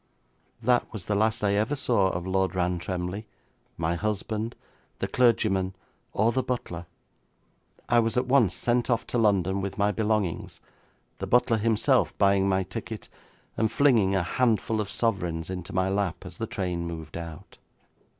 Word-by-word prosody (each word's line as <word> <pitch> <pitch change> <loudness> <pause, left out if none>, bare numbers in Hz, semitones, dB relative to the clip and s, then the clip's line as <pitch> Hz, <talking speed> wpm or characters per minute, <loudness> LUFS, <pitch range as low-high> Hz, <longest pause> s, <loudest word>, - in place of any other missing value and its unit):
That 125 +1 +2
was 110 -5 -6
the 105 - -1
last 110 +2 +1
I 100 -1 +3
ever 110 +8 +1
saw 115 -8 +2
of 85 -1 -3
Lord 95 0 0
Rantremly, 90 +3 -2 0.5
my 80 0 0
husband, 110 +4 -2 0.4
the - - -2
clergyman, 95 -6 +2 0.4
or 110 +3 +2
the 130 - +1
butler. 90 -10 -4 1.0
I 120 - +4
was 115 +1 +1
at 125 - +2
once 125 -8 +3
sent 120 +1 +1
off 115 -2 +1
to 120 - -1
London 100 -3 +2
with 95 0 -4
my 105 0 +2
belongings, 105 -4 -1 0.6
the - - -3
butler 125 -1 +3
himself 110 0 +2
buying 100 -1 +3
my 95 0 +2
ticket, - - -7 0.5
and 110 0 +1
flinging 115 -9 +4
a 95 - +2
handful 110 +2 +1
of 100 - -4
sovereigns 90 -8 -1
into 90 -2 -6
my 95 +1 +1
lap 95 -2 -1
as 90 -1 -10
the 115 - -2
train 90 -7 -3
moved 80 -2 -7
out.' 85 -2 -8
100 Hz, 160 wpm, -27 LUFS, 90-115 Hz, 1.0 s, I